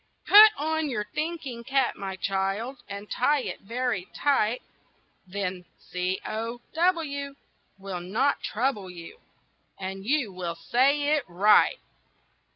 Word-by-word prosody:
"Put 430 Hz, +2 st, +10 dB
on 315 Hz, 0 st, -1 dB
your 215 Hz, -5 st, -1 dB
thinking 305 Hz, -7 st, -4 dB
cap, 270 Hz, 0 st, +1 dB
my 195 Hz, -1 st, -5 dB
child, 195 Hz, +7 st, -2 dB
And 200 Hz, +1 st, -7 dB
tie 290 Hz, +5 st, +2 dB
it -, -, -5 dB
very 235 Hz, -3 st, -2 dB
tight; 250 Hz, -5 st, +1 dB, 0.6 s
Then 185 Hz, -1 st, -4 dB
C 180 Hz, +1 st, -3 dB
O 230 Hz, +2 st, -4 dB
W 310 Hz, -5 st, 0 dB, 0.4 s
will 195 Hz, -2 st, -5 dB
not 220 Hz, +11 st, 0 dB
trouble 215 Hz, -5 st, -1 dB
you, 170 Hz, -2 st, -11 dB, 0.6 s
And 190 Hz, 0 st, -5 dB
you 250 Hz, -3 st, 0 dB
will 175 Hz, -2 st, -4 dB
say 280 Hz, -, +2 dB
it 295 Hz, -, -1 dB
right." 200 Hz, -, +4 dB
230 Hz, 125 wpm, -27 LUFS, 195-280 Hz, 0.6 s, Put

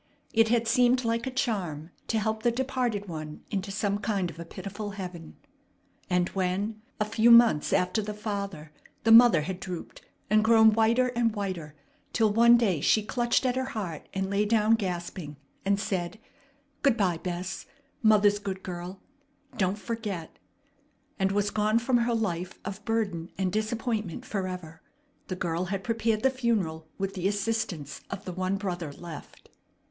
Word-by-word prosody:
It 225 Hz, 0 st, +5 dB
had 230 Hz, 0 st, +2 dB
seemed 250 Hz, +2 st, +3 dB
like 230 Hz, +2 st, 0 dB
a -, -, 0 dB
charm 190 Hz, -, -2 dB, 0.2 s
to 225 Hz, -, 0 dB
help 220 Hz, 0 st, -1 dB
the 240 Hz, -, +3 dB
departed 245 Hz, -4 st, -1 dB
one 155 Hz, -3 st, -7 dB
into 200 Hz, -1 st, -2 dB
some 200 Hz, 0 st, -1 dB
kind 200 Hz, -5 st, -1 dB
of 165 Hz, -, -14 dB
a 170 Hz, -, -6 dB
pitiful 205 Hz, +4 st, -6 dB
heaven. 175 Hz, -4 st, -7 dB, 0.7 s
And 180 Hz, -1 st, +2 dB
when, 195 Hz, +3 st, -2 dB, 0.2 s
a 210 Hz, -, +2 dB
few 220 Hz, +2 st, +3 dB
months 235 Hz, -10 st, +6 dB
after 180 Hz, +4 st, +2 dB
the 210 Hz, 0 st, -5 dB
father, 200 Hz, -7 st, -5 dB, 0.3 s
the 225 Hz, -, +4 dB
mother 230 Hz, -7 st, +8 dB
had 180 Hz, +4 st, -4 dB
drooped 180 Hz, -3 st, -7 dB, 0.3 s
and 215 Hz, +1 st, +4 dB
grown 220 Hz, -1 st, +6 dB
whiter 230 Hz, +3 st, +3 dB
and 235 Hz, -2 st, 0 dB
whiter, 180 Hz, -7 st, -4 dB, 0.4 s
till 220 Hz, -3 st, +3 dB
one 235 Hz, +2 st, +7 dB
day 195 Hz, -10 st, +1 dB
she 215 Hz, -, +3 dB
clutched 240 Hz, +3 st, +1 dB
at 250 Hz, -1 st, +1 dB
her 260 Hz, 0 st, 0 dB
heart 170 Hz, -8 st, -5 dB
and 190 Hz, -1 st, -2 dB
lay 200 Hz, +1 st, +2 dB
down 215 Hz, +1 st, +3 dB
gasping, 175 Hz, -7 st, -3 dB, 0.3 s
and 200 Hz, 0 st, +1 dB
said: 185 Hz, 0 st, -2 dB, 0.6 s
"Good 275 Hz, -4 st, +3 dB
by, 180 Hz, -6 st, +1 dB
Bess! 180 Hz, +1 st, -4 dB, 0.3 s
Mother's 210 Hz, -2 st, +5 dB
good 195 Hz, -2 st, -5 dB
girl! 180 Hz, +1 st, -7 dB, 0.5 s
Don't 190 Hz, +1 st, 0 dB
forget!" 205 Hz, -5 st, -5 dB, 0.8 s
and 190 Hz, 0 st, +2 dB
was 205 Hz, +1 st, +1 dB
gone 215 Hz, +1 st, +2 dB
from 240 Hz, +2 st, +2 dB
her 235 Hz, 0 st, +1 dB
life 185 Hz, -5 st, -2 dB
of 200 Hz, +1 st, -6 dB
burden 200 Hz, -7 st, -1 dB
and 185 Hz, -1 st, 0 dB
disappointment 220 Hz, 0 st, -2 dB
forever, 180 Hz, -7 st, -5 dB, 0.5 s
the 185 Hz, -, -3 dB
girl 175 Hz, 0 st, -2 dB
had 195 Hz, +1 st, -3 dB
prepared 225 Hz, -1 st, 0 dB
the 265 Hz, -, +4 dB
funeral 205 Hz, -11 st, -1 dB
with 195 Hz, 0 st, -2 dB
the 185 Hz, -1 st, -1 dB
assistance 200 Hz, -, -2 dB
of 195 Hz, 0 st, -6 dB
the 185 Hz, -, -5 dB
one 185 Hz, +2 st, -1 dB
brother 180 Hz, -6 st, -4 dB
left. 165 Hz, 0 st, -11 dB
205 Hz, 165 wpm, -28 LUFS, 180-225 Hz, 0.8 s, mother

